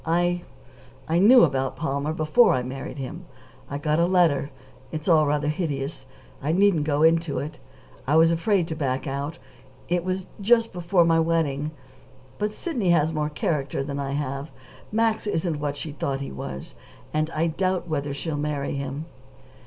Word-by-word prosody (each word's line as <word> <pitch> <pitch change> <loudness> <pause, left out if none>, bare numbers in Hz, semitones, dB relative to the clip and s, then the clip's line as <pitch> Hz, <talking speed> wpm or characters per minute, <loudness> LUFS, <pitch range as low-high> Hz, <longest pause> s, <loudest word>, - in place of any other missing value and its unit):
I 175 +2 +1 0.7
I 165 +2 +2
knew 240 +6 +8
about 135 -3 +1
Palmer 140 -1 -2
before 155 - +4
I 125 - -1
married 135 +3 -6
him. 140 +6 -6 0.4
I 140 - -3
got 150 +2 0
a 170 - +4
letter. 170 -6 +3 0.4
It's 155 +2 -5
all 155 -4 +5
rather 150 0 0
hideous 145 -4 -3 0.3
I 150 +3 0
needn't 185 -5 +3
go 150 0 +1
into 165 -2 +3
it. 150 +1 -5 0.5
I 145 - +3
was 165 +1 +6
afraid 170 +1 +1
to 160 - -3
back 135 -4 -1
out; 140 +3 -3 0.5
it 175 0 +1
was 185 0 -2 0.2
just 230 +2 +3
before 175 0 +2
my 165 0 +4
wedding. 160 -3 +1 0.7
But 210 0 0
Sidney 235 - -2
has 160 -2 +3
more 150 -1 -1
character 150 -2 -1
than 140 0 -4
I 140 -1 -2
have. 140 +1 -3 0.4
Max 220 0 +1
isn't 165 -5 -1
what 145 -1 -2
she 155 +2 -5
thought 140 -2 -2
he 140 - -5
was, 65 0 -7 0.4
and 155 +1 +1
I 165 0 0
doubt 185 +2 -1
whether 145 -3 -2
she'll 145 +2 -3
marry 145 -1 -2
him." 140 +2 -4
155 Hz, 170 wpm, -25 LUFS, 140-175 Hz, 0.7 s, knew